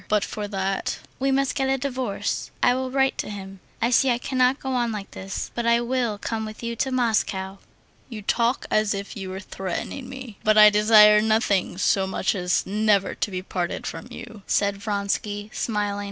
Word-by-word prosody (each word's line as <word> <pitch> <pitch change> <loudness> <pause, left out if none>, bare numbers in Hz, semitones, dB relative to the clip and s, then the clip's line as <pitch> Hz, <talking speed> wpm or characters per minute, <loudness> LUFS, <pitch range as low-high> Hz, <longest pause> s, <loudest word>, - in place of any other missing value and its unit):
But 210 -1 +2
for 210 -1 -5
that...." 195 -1 -2 0.2
"We 270 +1 +1
must 270 0 +1
get 270 -1 0
a 270 - +2
divorce. 255 -5 -3
I 245 - +5
will 260 0 -2
write 270 0 +1
to - - -3
him. 195 -2 -8 0.2
I 235 - +2
see 265 +2 +4
I 240 - +2
cannot 255 +1 +1
go 265 - -5
on 240 -2 0
like 210 -2 -6
this.... 195 +1 -5
But 235 -1 -2
I 235 0 +4
will 240 -3 -1
come 220 +2 -3
with 215 +1 -8
you 235 0 -3
to 265 - -1
Moscow." 205 -6 0 0.5
"You 220 -4 -7
talk 235 +4 +1
as 215 -1 +2
if 200 0 -6
you 195 -3 -6
were 190 +1 -5
threatening 195 +7 -5
me. 260 -5 -9
But 215 0 +3
I 210 0 +9
desire 210 0 +7
nothing 215 -4 +1
so 195 0 +2
much 190 - 0
as 180 -2 0
never 205 -1 +2
to - - -2
be 185 -1 -4
parted 180 -2 -3
from - - -6
you," 220 -3 -10
said 200 -1 +1
Vronsky, 205 0 -3
smiling. 205 -2 -1
215 Hz, 195 wpm, -24 LUFS, 200-245 Hz, 0.5 s, I